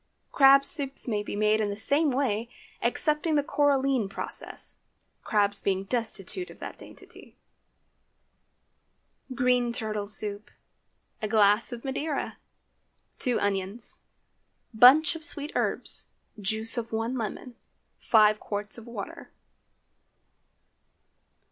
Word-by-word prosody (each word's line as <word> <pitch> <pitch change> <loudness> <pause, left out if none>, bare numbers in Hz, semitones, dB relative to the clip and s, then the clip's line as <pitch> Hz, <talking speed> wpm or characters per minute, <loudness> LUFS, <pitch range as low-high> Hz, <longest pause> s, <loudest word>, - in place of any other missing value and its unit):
Crab 275 0 +6
soup 275 -3 -2
may 210 -3 -1
be 205 - -6
made 215 +1 +2
in 210 - -1
the 200 - -5
same 290 +7 +1
way, 240 -4 -1 0.3
excepting 305 +1 0
the 290 - +2
coralline 275 -6 +1
process, - - -2 0.4
crabs 205 -2 +2
being 190 -1 0
destitute 230 - -2
of - - -13
that - - -9
dainty. - - -11 2.0
GREEN 250 -2 +2
TURTLE 215 -3 -3
SOUP. 210 0 0 0.7
A 215 - -1
glass 210 +1 +3
of 240 +1 -8
Madeira. 285 +2 -3 0.8
2 250 -3 0
onions. 200 +2 -3 0.7
Bunch 265 +9 +6
of 320 - -8
sweet 295 -1 -2
herbs. - - -3 0.3
Juice 220 +4 0
of 230 -1 -7
one 225 +2 -2
lemon. 240 +1 -5 0.4
5 215 -1 +4
qts 205 +2 -4
of 230 - -14
water. 220 -4 -8
230 Hz, 110 wpm, -27 LUFS, 210-270 Hz, 2.0 s, Crab